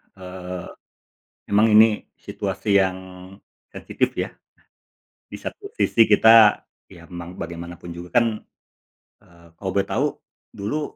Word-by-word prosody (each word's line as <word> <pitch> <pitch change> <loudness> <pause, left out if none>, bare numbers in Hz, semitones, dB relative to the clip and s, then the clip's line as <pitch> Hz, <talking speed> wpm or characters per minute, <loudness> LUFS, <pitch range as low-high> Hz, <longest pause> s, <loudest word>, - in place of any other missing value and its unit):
eee, 90 -1 -8 0.8
emang 105 +2 +4
ini 110 0 +5 0.2
situasi 100 -1 -2
yang 95 -1 0 0.7
sensitif - - -2
ya. - - -3 1.0
Di - - -7
satu 400 -2 -8
sisi 115 -1 +4
kita, 110 0 +6 0.3
ya 85 -3 -14
memang 85 +1 -9
bagaimanapun 85 +1 -8
juga 90 +6 -1
kan, 120 - +3 0.9
eee, 85 -4 -21
kalau 95 - -4
boleh 100 - 0
tahu - - 0 0.5
dulu 105 +10 -3
95 Hz, 115 wpm, -22 LUFS, 85-105 Hz, 1.0 s, kita